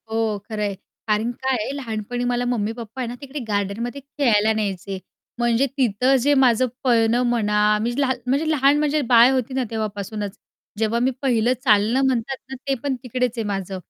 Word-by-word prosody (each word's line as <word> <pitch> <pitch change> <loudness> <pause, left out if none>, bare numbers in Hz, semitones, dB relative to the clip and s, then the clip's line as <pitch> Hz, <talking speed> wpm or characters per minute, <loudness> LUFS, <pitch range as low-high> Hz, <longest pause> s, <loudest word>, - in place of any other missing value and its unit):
हो 220 -1 0
खरं 215 -1 -4
आहे. 200 -1 -2 0.3
कारण 215 +2 +1
काय 260 +2 -1
आहे - - -4
लहानपणी 245 -2 -4
मला 245 0 0
मम्मी 225 -3 0
पप्पा 235 +2 -7
आहे 245 - -2
ना, 240 - -5
तिकडे 280 +1 -6
गार्डनमध्ये 215 +6 -2
खेळायला 240 -7 +2
न्यायचे 195 -3 -3 0.4
म्हणजे 240 +2 +2
तिथं 250 +1 +2
जे 290 +4 +3
माझं 255 0 +4 0.2
पळणं 235 -1 +3
म्हणा, 210 -3 +2
मी 235 +2 -1
लहा 260 -2 +2
म्हणजे 280 +5 +1
लहान 285 -1 +4
म्हणजे 300 0 +1
बाळ 240 +2 +7
होती 260 0 -1
ना 260 0 0
तेव्हापासूनच, 210 -1 -4 0.4
जेव्हा 225 +1 +1
मी 260 - +2
पहिलं 245 -3 +2
चालणं 220 +1 +3
म्हणतात 260 +1 -1
ना, 265 - -5
ते 275 - +2
पण 280 -2 0
तिकडेच 250 0 -1
आहे 225 - -1
माझं. 195 -1 -3
235 Hz, 180 wpm, -22 LUFS, 215-260 Hz, 0.4 s, बाळ